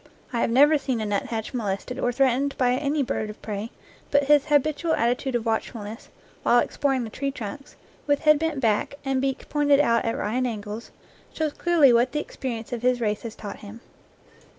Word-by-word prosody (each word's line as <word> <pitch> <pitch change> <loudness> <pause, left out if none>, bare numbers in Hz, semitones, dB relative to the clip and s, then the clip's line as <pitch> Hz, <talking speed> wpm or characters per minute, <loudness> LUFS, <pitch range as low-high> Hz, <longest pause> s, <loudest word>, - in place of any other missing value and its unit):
I 235 - 0
have - - +1
never 290 +5 +5
seen 260 -4 -2
a 215 - -2
nuthatch 215 +3 -2
molested 230 +2 -3
or 245 - +1
threatened 270 +2 +1
by 250 -1 +3
any 285 +3 0
bird 220 -3 -2
of 210 - -9
prey, 210 +1 -4 0.4
but 285 0 +3
his 290 0 +4
habitual 305 +3 +2
attitude 245 +2 0
of 235 -1 -1
watchfulness 225 0 -3 0.3
while 240 - +4
exploring 265 +1 +1
the 225 - -7
tree 275 +4 -2
trunks, 265 +1 -7 0.3
with 285 -1 +2
head 305 -1 +5
bent 320 -3 -1
back 225 +2 +1
and 270 -1 0
beak 270 0 -2
pointing 290 -1 +3
out 235 -5 +3
at 230 - -1
right 240 +5 -1
angles, 215 -2 -5 0.4
shows 310 -2 -2
clearly 325 -7 +4
what 245 +2 +3
the 300 - 0
experience 240 -6 -5
of 235 - -3
his 250 0 +2
race 210 -3 -1
has 230 -2 -7
taught 205 -2 -7
him. 210 +2 -10
250 Hz, 195 wpm, -25 LUFS, 225-280 Hz, 0.4 s, never